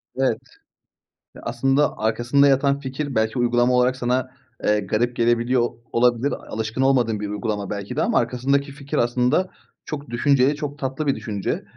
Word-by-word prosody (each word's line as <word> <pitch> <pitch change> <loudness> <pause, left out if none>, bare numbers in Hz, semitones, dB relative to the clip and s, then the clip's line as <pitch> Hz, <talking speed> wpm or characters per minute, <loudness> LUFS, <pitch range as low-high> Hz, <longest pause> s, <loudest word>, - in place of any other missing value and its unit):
Evet. 130 -3 +1 1.0
Ya, - - -11
aslında, 135 +4 +1
arkasında 120 +6 +2
yatan 140 +1 +3
fikir 140 +1 -4
belki 110 +3 0
uygulama 120 +1 +2
olarak 125 +1 +3
sana, 130 0 -1 0.3
eee, 105 0 +3
garip 110 +5 -1
gelebiliyor 120 +1 +2
o 120 - -3
olabilir. 120 +3 +2
Alışkın 110 +3 -4
olmadığın 125 -5 +2
bir 105 - -3
uygulama 105 -1 -3
belki 100 +3 -5
de 150 - 0
ama 235 -1 +1
arkasındaki 140 +3 0
fikir, 140 0 -5
aslında, 125 +9 +2 0.4
çok 145 -1 -6
düşünceli, 135 +3 +3
çok 145 -1 -6
tatlı 135 +2 -3
bir 140 - +2
düşünce. 100 -4 -3
125 Hz, 160 wpm, -22 LUFS, 115-140 Hz, 1.0 s, yatan